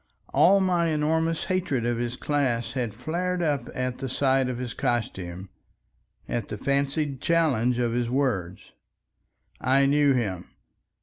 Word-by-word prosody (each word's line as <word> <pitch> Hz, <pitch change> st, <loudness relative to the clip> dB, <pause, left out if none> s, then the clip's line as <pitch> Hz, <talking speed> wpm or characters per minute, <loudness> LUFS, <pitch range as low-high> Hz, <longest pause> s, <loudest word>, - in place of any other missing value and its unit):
All 195 Hz, +3 st, +6 dB
my 175 Hz, -3 st, +2 dB
enormous 160 Hz, +1 st, +1 dB
hatred 180 Hz, -10 st, -1 dB
of 120 Hz, -1 st, 0 dB
his 120 Hz, 0 st, -2 dB
class 130 Hz, -6 st, 0 dB
had 120 Hz, -5 st, -3 dB
flared 175 Hz, +8 st, -2 dB
up 145 Hz, -6 st, -1 dB
at 125 Hz, -1 st, -2 dB
the 135 Hz, -, -4 dB
sight 135 Hz, 0 st, +2 dB
of 125 Hz, -, -3 dB
his 125 Hz, -1 st, -4 dB
costume, 95 Hz, -7 st, -3 dB, 0.8 s
at -, -, -3 dB
the -, -, -5 dB
fancied 140 Hz, 0 st, -1 dB
challenge 145 Hz, -8 st, +2 dB
of 120 Hz, -1 st, 0 dB
his 120 Hz, -1 st, 0 dB
words. 115 Hz, -10 st, -1 dB, 0.9 s
I 135 Hz, +2 st, +3 dB
knew 145 Hz, 0 st, +4 dB
him. 100 Hz, -8 st, -2 dB
135 Hz, 140 wpm, -26 LUFS, 120-155 Hz, 0.9 s, All